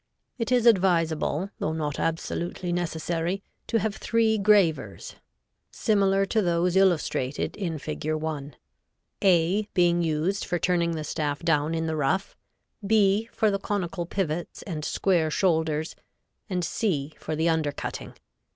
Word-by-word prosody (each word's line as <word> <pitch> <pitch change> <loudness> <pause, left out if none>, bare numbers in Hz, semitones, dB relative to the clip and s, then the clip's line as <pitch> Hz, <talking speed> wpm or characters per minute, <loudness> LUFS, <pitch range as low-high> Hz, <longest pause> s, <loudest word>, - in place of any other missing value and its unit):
It 230 +1 -2
is 245 -2 +3
advisable, 180 -4 +2
though 155 - -1
not 150 -2 -3
absolutely 170 +2 -2
necessary, 175 +2 -2 0.2
to 230 - +1
have 215 -1 -1
three 225 -2 +1
gravers 200 -6 +2 0.5
similar 195 -3 +2
to 220 +3 +1
those 175 0 +1
illustrated 170 -8 +1
in 170 -6 -3
Fig. 155 +1 -4
1, 155 -2 -4 0.7
A 185 +1 +3
being 175 -1 +3
used 165 +4 0
for 175 - -1
turning 170 -1 +1
the 155 -1 -3
staff 150 -1 -2
down 160 -1 +1
in 160 0 -1
the 160 -1 -1
rough; 160 +7 0 0.5
B 210 +1 +3
for 215 -1 +2
the 200 - -1
conical 190 -3 -3
pivots 175 -3 -3
and 160 -6 -5
square 170 -1 +1
shoulders 160 -2 0 0.5
and 180 -3 -1
C 155 -10 -1
for 155 - -4
the 160 +2 +1
under 160 -3 +1
cutting. - - -6
175 Hz, 140 wpm, -26 LUFS, 160-195 Hz, 0.7 s, is